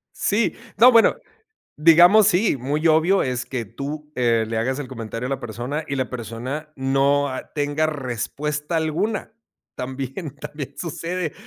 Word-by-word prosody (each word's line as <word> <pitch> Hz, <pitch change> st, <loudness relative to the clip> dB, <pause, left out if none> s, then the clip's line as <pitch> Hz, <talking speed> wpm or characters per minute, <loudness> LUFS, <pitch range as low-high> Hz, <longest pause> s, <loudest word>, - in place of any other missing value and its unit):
Sí, 210 Hz, +2 st, +1 dB, 0.2 s
no, 250 Hz, +3 st, +8 dB
bueno, 230 Hz, -1 st, +5 dB, 0.6 s
digamos 175 Hz, +7 st, +7 dB
sí, 195 Hz, -5 st, +2 dB
muy 145 Hz, +6 st, 0 dB
obvio 160 Hz, +5 st, +4 dB
es 125 Hz, -2 st, -2 dB
que 125 Hz, -3 st, -4 dB
tú, 150 Hz, +7 st, -7 dB
eh, 115 Hz, -3 st, +2 dB
le 115 Hz, 0 st, -3 dB
hagas 130 Hz, +5 st, -1 dB
el 135 Hz, -, -5 dB
comentario 115 Hz, 0 st, -5 dB
a -, -, -5 dB
la 135 Hz, -, -2 dB
persona, 120 Hz, +7 st, -4 dB
y 140 Hz, -, -2 dB
la 130 Hz, -2 st, -2 dB
persona 125 Hz, +6 st, -6 dB
no, 135 Hz, +1 st, +2 dB
ah, 130 Hz, -, -7 dB
tenga 145 Hz, +1 st, 0 dB
respuesta 150 Hz, +3 st, -3 dB
alguna. 180 Hz, +8 st, -2 dB, 0.4 s
También 135 Hz, +4 st, -5 dB
también 150 Hz, -2 st, -7 dB
sucede, 170 Hz, 0 st, -3 dB
145 Hz, 150 wpm, -22 LUFS, 125-160 Hz, 0.6 s, no